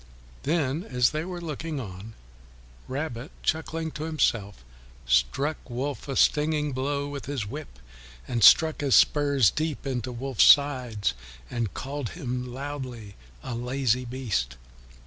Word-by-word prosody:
Then 150 0 0
as 125 - +2
they 155 +1 -2
were 180 0 -5
looking 160 -2 -4
on, 105 -1 -8 0.7
Rabbit, 135 -1 -4
chuckling 160 0 -1
to 150 +1 -5
himself, 115 - 0 0.4
struck 60 - +2
Wolf 135 +5 -4
a 135 - -3
stinging 150 0 +2
blow 140 +2 -2
with 145 -1 -7
his 140 -6 -2
whip, 140 - -8 0.5
and 120 -3 -1
stuck 160 - +7
his 140 -3 +3
spurs 140 -7 +4
deep 155 -2 -3
into 130 -2 -2
Wolf's 130 0 +2
sides 125 - +4 0.4
and 115 -5 -2
called 140 -2 -4
him 125 -5 -4
loudly 130 -6 -6 0.3
a - - -4
lazy 125 +1 0
beast. 115 - -2
135 Hz, 130 wpm, -27 LUFS, 120-150 Hz, 0.7 s, stuck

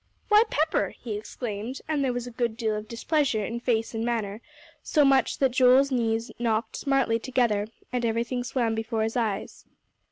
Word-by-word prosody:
"Why, 420 0 +7
Pepper!" 310 +2 0
he 225 -4 -5
exclaimed, 215 +3 -5
and 300 -3 0
there 260 - +1
was 245 0 -3
a 245 - -7
good 235 -1 -2
deal 220 -2 0
of 210 0 -5
displeasure 235 -1 0
in 235 +3 -4
face 230 -2 0
and 225 0 -2
manner; 225 -3 -2 0.4
so 300 -3 +3
much 270 -1 +3
so 275 - +2
that 260 - +2
Joel's 260 +2 +5
knees 230 -2 0
knocked 230 -1 0
smartly 270 -5 +1
together, 230 -5 +1 0.3
and 250 -1 0
everything 235 +2 -1
swam 240 -2 0
before 225 0 -1
his 225 +1 -2
eyes. 220 -5 -2
235 Hz, 185 wpm, -26 LUFS, 225-260 Hz, 0.4 s, Why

